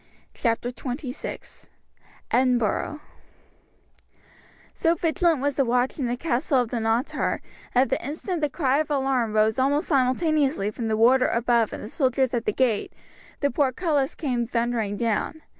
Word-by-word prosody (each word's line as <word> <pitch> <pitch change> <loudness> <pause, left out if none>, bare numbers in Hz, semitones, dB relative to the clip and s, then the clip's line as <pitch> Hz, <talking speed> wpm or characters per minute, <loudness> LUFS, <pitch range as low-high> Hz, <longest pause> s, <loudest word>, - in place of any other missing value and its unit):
Chapter 235 0 -1
XXVI 255 +1 -7 0.6
Edinburgh 250 +3 +1 1.7
So 330 0 +1
vigilant 330 -2 +1
was 285 -1 -1
the 275 - +4
watch 250 +4 0
in 260 - 0
the 240 +1 -2
castle 265 -1 +1
of 240 - -3
Dunottar 230 +2 0 0.4
that 255 +2 +4
the - - 0
instant 320 +5 -4
the 295 - +1
cry 275 -1 +1
of 310 - -1
alarm 265 -6 0
rose 215 +2 +2
almost 285 +3 +1
simultaneously 275 - +1
from 225 +1 -4
the 220 -1 0
warder 255 +3 +5
above 235 -1 +1
and - - -7
the - - -6
soldiers 260 0 0
at 235 -2 -1
the - - +2
gate, 230 -2 0 0.5
the 285 - +2
portcullis 280 +2 0
came 245 -6 -1
thundering 230 -3 -1
down. 235 +8 -1
255 Hz, 145 wpm, -25 LUFS, 235-285 Hz, 1.7 s, warder